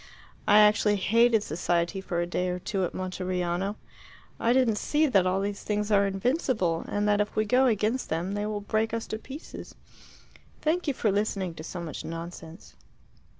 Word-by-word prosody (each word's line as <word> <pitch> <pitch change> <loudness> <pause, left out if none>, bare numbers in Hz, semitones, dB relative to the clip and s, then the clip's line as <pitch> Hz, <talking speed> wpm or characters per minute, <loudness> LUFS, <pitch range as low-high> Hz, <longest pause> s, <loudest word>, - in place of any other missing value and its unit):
I 205 - +6
actually 210 0 +5
hated 225 +2 +3
society 175 +3 -1
for 175 -3 -2
a - - 0
day 180 +1 -1
or 180 - -2
two 190 +1 -2
at - - -6
Monteriano. 185 +1 -2 0.6
I 230 - +2
didn't 245 -4 +3
see 305 +1 +2
that 195 -10 +3
all 185 +1 +1
these 200 +1 -3
things 210 0 -2
are 200 -1 +4
invincible, 195 - 0
and 205 0 -1
that 210 0 +3
if 210 - -3
we 215 - +2
go 255 +4 +4
against 220 +2 0
them 170 +5 -2
they 205 +1 -2
will 210 -1 -3
break 220 +2 0
us 230 - -3
to 215 - -5
pieces. 275 +6 -10 0.8
Thank 335 +3 0
you 285 - 0
for 215 - +1
listening 195 -3 -1
to 155 - -9
so 175 +2 -6
much 165 -3 -6
nonsense." 165 +1 -8
205 Hz, 185 wpm, -27 LUFS, 180-220 Hz, 0.8 s, I